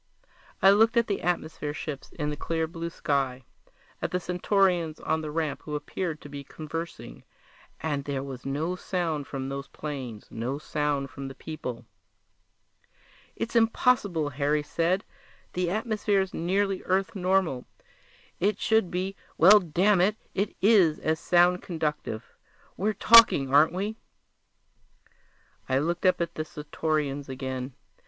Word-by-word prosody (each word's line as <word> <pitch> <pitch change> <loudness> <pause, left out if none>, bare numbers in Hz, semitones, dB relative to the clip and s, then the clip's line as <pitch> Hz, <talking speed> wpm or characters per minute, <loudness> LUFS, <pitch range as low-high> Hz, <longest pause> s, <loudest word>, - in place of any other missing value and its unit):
I 195 - +9
looked 225 +3 +4
at 235 - +4
the 200 - -2
atmosphere 155 -3 -2
ships 150 -4 -6
in 150 -1 -2
the - - -3
clear 160 +2 -1
blue 165 +1 -5
sky, 135 -5 -1 0.6
at - - -1
the 180 - -1
Centaurians 180 -2 +1
on 160 0 -1
the 155 - -5
ramp 155 -1 -2
who 150 - -5
appeared 160 +1 -4
to - - -10
be 140 -1 -7
conversing 155 - -7 0.6
and 145 -3 -1
there 140 -2 -2
was 130 -2 -7
no 155 +6 -2
sound 165 -6 -2
from 135 -1 -4
those 140 0 -5
planes, 130 -8 -6
no 125 +5 -3
sound 145 -2 -2
from 135 -1 -7
the 135 - -8
people! 130 -6 -6 1.5
"It's 230 - -4
impossible," 225 - +2
Harry 145 +2 0
said. 170 +6 0 0.5
"The 180 -1 0
atmosphere's 205 -2 0
nearly 195 +3 0
Earth 190 +2 0
normal. 185 -8 +1 0.7
It 205 +4 +1
should 220 -5 +2
be 185 +3 -3 0.2
well, 200 +6 +8
damn 185 +2 +2
it, 205 +4 +3 0.2
it 200 +2 -1
is 195 -8 +5
as 160 0 -1
sound 180 +1 +4
conductive; 150 -9 -3 0.5
we're 210 +3 0
talking, 210 - +7
aren't 150 +3 +6
we?" 205 +5 -3 1.7
I 130 - +3
looked 170 +6 0
up 185 - +3
at 170 0 -2
the 155 - -3
Centaurians 150 -2 -3
again. 130 -1 -5
160 Hz, 140 wpm, -27 LUFS, 145-190 Hz, 1.7 s, I